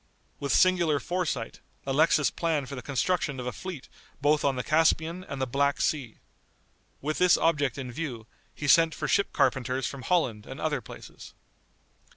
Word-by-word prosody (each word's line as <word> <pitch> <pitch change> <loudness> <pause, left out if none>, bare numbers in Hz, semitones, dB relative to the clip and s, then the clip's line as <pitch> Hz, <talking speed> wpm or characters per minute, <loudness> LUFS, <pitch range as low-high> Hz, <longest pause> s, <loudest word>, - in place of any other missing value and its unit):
With 140 -1 -2
singular 175 -5 +3
foresight, 175 -7 -3 0.3
Alexis 145 +1 +3
planned 155 -5 -1
for 140 - -8
the 130 - -5
construction 145 +1 -1
of 125 - -5
a 125 - -2
fleet 180 -4 -8 0.3
both 145 +2 +2
on 140 -1 +2
the 125 - -3
Caspian 165 +2 +2
and 140 - -6
the 130 - 0
Black 140 +3 0
Sea. 130 -8 -1 0.8
With 155 +2 -2
this 180 -1 +5
object 145 -6 +1
in 130 -2 -5
view, 125 -6 -5 0.3
he 145 - -4
sent 165 +3 +5
for - - -3
ship 200 - +2
carpenters 130 -1 0
from 140 - -5
Holland 125 -11 0
and 130 - -8
other 150 -4 -1
places. 105 - -12
145 Hz, 170 wpm, -27 LUFS, 130-165 Hz, 0.8 s, this